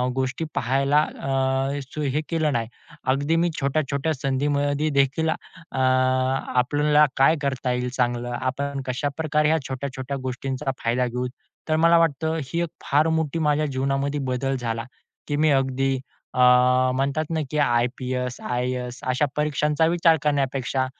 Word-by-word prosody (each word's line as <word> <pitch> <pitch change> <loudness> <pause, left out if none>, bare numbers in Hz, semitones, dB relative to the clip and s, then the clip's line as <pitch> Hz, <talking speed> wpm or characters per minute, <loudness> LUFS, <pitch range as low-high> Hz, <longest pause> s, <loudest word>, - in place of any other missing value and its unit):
गोष्टी 130 +4 -1
पाहायला 135 +4 +2
अ, 135 -1 -1
स 135 +3 -9
हे 150 - +1
केलं 160 -3 +1
नाही. 115 -2 -1 0.5
अगदी 145 +4 0
मी 170 +1 +2
छोट्या-छोट्या 140 +2 0
संधीमध्ये 145 +2 0
देखील 140 +4 +2
अ, - - +3 0.5
आपल्याला 130 +3 +2
काय 135 +5 +5
करता 135 -2 -1
येईल 125 0 -1
चांगलं, 120 -1 -1
आपण 140 +2 -2
कशाप्रकारे 150 +3 0
ह्या 160 - +3
छोट्या-छोट्या 135 0 -4
गोष्टींचा 130 +2 -3
फायदा 120 +2 +1
घेऊ, 125 +1 -2 0.4
तर 155 - +3
मला 165 +1 +5
वाटतं 160 0 +1
ही 170 +6 -2
एक 170 - -3 0.2
फार 150 +3 +3
मोठी 160 0 -2
माझ्या 150 +1 +2
जीवनामध्ये 135 +1 -1
बदल 135 +2 -1
झाला, 115 -1 -3 0.4
की 145 - -1
मी 155 +1 +3
अगदी 135 0 +1 0.4
अ, - - -3 0.6
म्हणतात 140 +4 0
ना, 160 - -1
की 150 - -2
आय-पी-एस, 125 -1 0
आय-ए-एस 125 0 -2
अशा 130 +4 +2
परीक्षांचा 150 +1 +1
विचार 165 -1 +4
करण्यापेक्षा 135 -2 0
135 Hz, 140 wpm, -24 LUFS, 130-150 Hz, 0.6 s, काय